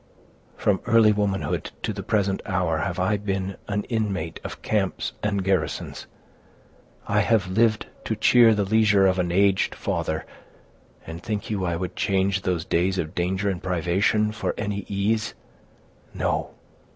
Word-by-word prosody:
"From 100 Hz, -2 st, +1 dB
early 115 Hz, -2 st, +6 dB
womanhood 95 Hz, -6 st, -1 dB
to 110 Hz, -, -1 dB
the 100 Hz, -, -5 dB
present 100 Hz, -1 st, 0 dB
hour 90 Hz, -4 st, 0 dB
have 90 Hz, +1 st, -2 dB
I 95 Hz, +3 st, +1 dB
been 95 Hz, -1 st, -3 dB
an 105 Hz, 0 st, -1 dB
inmate 100 Hz, -8 st, -2 dB
of -, -, -8 dB
camps 100 Hz, -4 st, -1 dB
and 100 Hz, -2 st, 0 dB
garrisons. 90 Hz, -6 st, -1 dB, 1.0 s
I 100 Hz, -, +2 dB
have 105 Hz, -3 st, +2 dB
lived 110 Hz, +1 st, +2 dB, 0.2 s
to 110 Hz, -, -1 dB
cheer 115 Hz, +1 st, +6 dB
the 105 Hz, -, +1 dB
leisure 105 Hz, -1 st, +4 dB
of 95 Hz, 0 st, +2 dB
an 90 Hz, -1 st, 0 dB
aged 95 Hz, +1 st, +2 dB
father, 80 Hz, 0 st, -2 dB, 0.8 s
and 80 Hz, +1 st, -7 dB
think 105 Hz, 0 st, -4 dB
you 95 Hz, -3 st, -1 dB
I 85 Hz, -1 st, 0 dB
would 90 Hz, +1 st, -4 dB
change 95 Hz, 0 st, +1 dB
those 90 Hz, -3 st, -1 dB
days 95 Hz, +3 st, +1 dB
of 80 Hz, -1 st, -3 dB
danger 95 Hz, +2 st, -1 dB
and 95 Hz, -3 st, -1 dB
privation 95 Hz, +4 st, +1 dB
for 105 Hz, 0 st, -3 dB
any 100 Hz, -1 st, -3 dB
ease? 105 Hz, +2 st, -1 dB, 0.8 s
No! -, -, -1 dB
100 Hz, 150 wpm, -24 LUFS, 90-105 Hz, 1.0 s, early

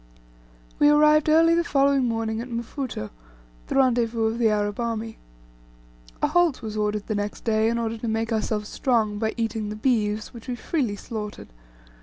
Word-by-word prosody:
We 295 Hz, -, +6 dB
arrived 300 Hz, +1 st, +5 dB
early 330 Hz, +2 st, +5 dB
the 340 Hz, 0 st, +2 dB
following 275 Hz, -3 st, +2 dB
morning 225 Hz, -1 st, -1 dB
at 250 Hz, -, -8 dB
Mfuto, 235 Hz, -, -5 dB, 0.6 s
the -, -, -3 dB
rendezvous 240 Hz, -4 st, +2 dB
of 225 Hz, +1 st, -1 dB
the 230 Hz, -2 st, +4 dB
Arab 205 Hz, 0 st, -1 dB
army. 230 Hz, -1 st, -3 dB, 1.0 s
A -, -, +5 dB
halt 350 Hz, -8 st, +2 dB
was 215 Hz, -1 st, -5 dB
ordered 210 Hz, -1 st, -1 dB
the 215 Hz, -, -2 dB
next 205 Hz, 0 st, -4 dB
day, 220 Hz, -1 st, +2 dB
in 235 Hz, -, 0 dB
order 230 Hz, -1 st, -2 dB
to 235 Hz, -, -4 dB
make 225 Hz, +1 st, -1 dB
ourselves 215 Hz, -1 st, -1 dB
strong 220 Hz, -6 st, 0 dB
by 220 Hz, 0 st, -1 dB
eating 225 Hz, -2 st, -2 dB
the 210 Hz, -, -5 dB
beeves, 215 Hz, -2 st, 0 dB
which 235 Hz, 0 st, -11 dB
we 250 Hz, -, -2 dB
freely 245 Hz, -6 st, -2 dB
slaughtered. 210 Hz, 0 st, -7 dB
225 Hz, 175 wpm, -24 LUFS, 215-255 Hz, 1.0 s, We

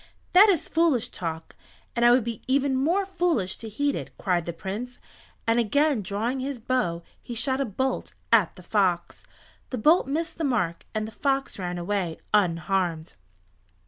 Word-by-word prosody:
"That 395 Hz, +4 st, +8 dB
is 355 Hz, -7 st, +2 dB
foolish 320 Hz, -8 st, +2 dB
talk, 160 Hz, -2 st, -6 dB, 0.4 s
and 235 Hz, -, +1 dB
I 240 Hz, -, +7 dB
would 245 Hz, 0 st, +5 dB
be 230 Hz, -2 st, -5 dB
even 270 Hz, 0 st, +2 dB
more 335 Hz, +9 st, +2 dB
foolish 345 Hz, -, 0 dB
to 225 Hz, -, -7 dB
heed 285 Hz, +7 st, 0 dB
it," -, -, -5 dB
cried 175 Hz, -3 st, 0 dB
the -, -, -1 dB
Prince, 210 Hz, +9 st, -6 dB, 0.5 s
and 230 Hz, +1 st, +3 dB
again 285 Hz, +2 st, +2 dB
drawing 215 Hz, +7 st, -2 dB
his 270 Hz, +1 st, -3 dB
bow 225 Hz, -9 st, -1 dB, 0.2 s
he 240 Hz, -, -7 dB
shot 265 Hz, +3 st, 0 dB
a -, -, +1 dB
bolt 260 Hz, +4 st, -2 dB, 0.2 s
at 210 Hz, -7 st, +4 dB
the 180 Hz, -, -13 dB
fox. 180 Hz, -2 st, 0 dB, 0.5 s
The 255 Hz, -, -3 dB
bolt 305 Hz, +7 st, +4 dB
missed 320 Hz, +4 st, -3 dB
the -, -, -1 dB
mark, 215 Hz, -, -1 dB
and 215 Hz, 0 st, -1 dB
the -, -, -9 dB
fox 270 Hz, -2 st, -1 dB
ran 180 Hz, -1 st, -3 dB
away 175 Hz, -2 st, -2 dB, 0.2 s
unharmed. 175 Hz, -3 st, +1 dB
235 Hz, 175 wpm, -26 LUFS, 185-275 Hz, 0.5 s, That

